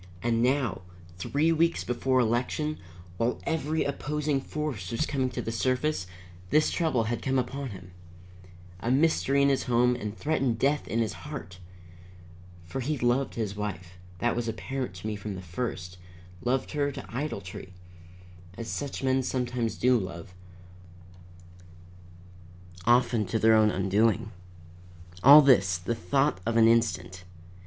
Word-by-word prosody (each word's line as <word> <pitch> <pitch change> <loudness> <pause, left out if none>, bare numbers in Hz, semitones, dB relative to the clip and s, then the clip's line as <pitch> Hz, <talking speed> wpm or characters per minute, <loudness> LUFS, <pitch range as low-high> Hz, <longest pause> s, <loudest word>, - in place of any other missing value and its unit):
And 115 -1 +1
now, 125 -4 +1 0.4
three 150 - +1
weeks 165 +1 +2
before 130 +1 +1
election, 125 +6 0 0.4
while 115 +4 0
every 160 -1 -1
opposing 145 0 -1
force 135 -12 -4
was 115 +8 -1
coming 130 -4 -1
to 125 - -5
the 115 - -3
surface, 130 -2 0 0.4
this 155 +1 +3
trouble 155 -9 +1
had 115 +2 -2
come 135 0 0
upon 135 +2 -2
him. 95 -3 -10 0.9
A 115 - -3
mystery 140 0 +3
in 140 - +4
his 135 - +1
home 125 0 +3
and 105 -1 -5
threatened 135 -6 0
death 140 +4 +1
in 115 - -2
his 110 -3 -1
heart! 90 +3 -8 1.1
For 85 +10 -5
he 145 +4 -1
loved 125 +2 +1
his 105 -3 -3
wife 90 -4 -6 0.2
that 120 +5 0
was 120 -1 -2
apparent 130 -1 -4
to 90 - -10
me 110 -1 -2
from 100 0 -6
the 95 - -7
first; 90 -1 -5 0.4
loved 130 +2 0
her 145 -2 0
to - - -9
idolatry, 100 -10 -5 0.9
as 115 - -6
such 140 +3 -4
men 130 0 +2
sometimes 125 -3 -2
do 125 0 +3
love, 90 -2 -7 2.5
often 120 -3 +3
to 105 - 0
their 110 0 +5
own 110 -1 +5
undoing. 105 +3 +1 0.9
All 145 +6 +10
this, 100 -10 +4
the 90 +7 -3
thought 135 +2 0
of 115 +2 0
an 115 -1 +6
instant. 95 -6 +1
120 Hz, 145 wpm, -28 LUFS, 105-135 Hz, 2.5 s, All